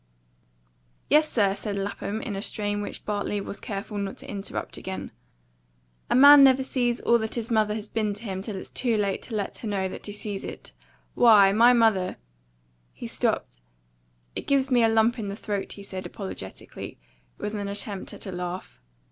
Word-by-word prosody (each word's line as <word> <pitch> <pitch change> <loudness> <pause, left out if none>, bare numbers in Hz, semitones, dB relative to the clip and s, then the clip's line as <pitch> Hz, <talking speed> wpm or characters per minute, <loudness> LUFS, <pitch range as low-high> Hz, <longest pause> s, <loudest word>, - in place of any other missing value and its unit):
"Yes, 305 +1 +5
sir," 200 -4 +3
said 205 0 -4
Lapham, 200 +2 -3
in 205 - -4
a 195 - -3
strain 205 -1 -2
which 205 - -7
Bartley 205 0 -1
was 200 - -6
careful 205 +1 -5
not 195 -1 -4
to - - -10
interrupt 200 -1 -5
again, 190 0 -6 1.0
"a - - +2
man 285 +2 +10
never 265 0 +6
sees 245 -2 0
all 235 0 +4
that 220 0 -3
his 235 0 -3
mother 215 -1 +2
has 215 -1 -5
been 210 -2 -1
to 210 - -8
him 190 -4 -4
till 210 0 -5
it's 190 - -7
too 235 -3 0
late 200 -2 0
to 225 - -6
let 205 -2 -3
her 225 - -5
know 195 -2 0
that 185 - -7
he - - -5
sees 205 -1 -3
it. - - -8 0.4
Why, 210 -5 +7
my 230 +4 +6
mother 220 -6 +2 0.4
" - - -40 0.3
he - - -8
stopped. - - -2 0.7
"It - - -5
gives 275 -1 +2
me 245 -2 +5
a 225 - +5
lump 225 +2 +3
in 210 - -3
the 200 - -4
throat," 205 -2 -4
he 200 - -10
said 190 -1 -5
apologetically, 190 - -8 0.4
with 210 - -4
an 205 -1 -3
attempt 200 -1 -3
at - - -6
a 190 - -5
laugh. 180 - -6
205 Hz, 195 wpm, -26 LUFS, 195-230 Hz, 1.0 s, man